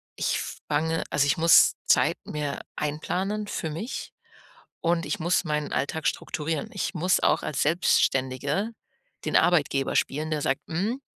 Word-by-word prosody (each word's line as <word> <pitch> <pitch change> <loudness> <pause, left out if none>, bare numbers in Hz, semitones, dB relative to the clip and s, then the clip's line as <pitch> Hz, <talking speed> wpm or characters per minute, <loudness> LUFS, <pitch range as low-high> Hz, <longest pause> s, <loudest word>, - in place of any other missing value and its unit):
ich - - 0 0.3
fange 160 +2 0
also, 140 - +2
ich 145 - +2
muss 165 +1 +6
Zeit - - +3
mir 150 -2 -3 0.2
einplanen 185 +8 -2
für 160 - -3
mich 170 - -5 0.7
und 165 0 +1
ich 205 - -2
muss 175 +3 +1
meinen 150 -2 -2
Alltag 145 +4 -2
strukturieren. 155 -1 -2
Ich - - -3
muss 180 +2 +2
auch - - +2
als 145 - -1
Selbstständige 145 - +1 0.5
den - - -1
Arbeitgeber 145 -6 +2
spielen, 155 +3 0
der 150 - 0
sagt: 135 - 0
„Hm, 210 +11 -2
160 Hz, 145 wpm, -26 LUFS, 145-175 Hz, 0.7 s, muss